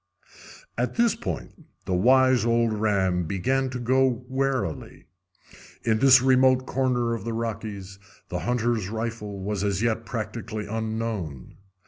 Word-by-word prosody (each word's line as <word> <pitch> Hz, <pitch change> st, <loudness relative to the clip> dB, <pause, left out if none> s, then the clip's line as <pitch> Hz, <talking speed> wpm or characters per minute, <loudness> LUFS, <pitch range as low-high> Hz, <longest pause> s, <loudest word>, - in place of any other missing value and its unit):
At 125 Hz, -, -1 dB
this 235 Hz, -2 st, +3 dB
point -, -, -7 dB, 0.2 s
the 95 Hz, -, -2 dB
wise 130 Hz, +6 st, +4 dB
old 115 Hz, -1 st, +2 dB
ram 95 Hz, -5 st, +1 dB
began 130 Hz, +10 st, 0 dB
to 125 Hz, -, -4 dB
go 130 Hz, +2 st, +3 dB, 0.2 s
warily. 130 Hz, -, -2 dB, 0.8 s
In 110 Hz, -2 st, +1 dB
this 130 Hz, -1 st, +7 dB
remote 130 Hz, 0 st, +4 dB
corner 125 Hz, -3 st, 0 dB
of 115 Hz, -, -4 dB
the 115 Hz, 0 st, -3 dB
Rockies 105 Hz, -4 st, -5 dB, 0.3 s
the 90 Hz, -, -3 dB
hunter's 120 Hz, -3 st, -1 dB
rifle 110 Hz, -2 st, -4 dB
was 100 Hz, 0 st, -2 dB
as 100 Hz, +1 st, 0 dB
yet 115 Hz, -1 st, 0 dB
practically 110 Hz, -2 st, -5 dB
unknown. 110 Hz, -, -4 dB
115 Hz, 130 wpm, -25 LUFS, 105-125 Hz, 0.8 s, this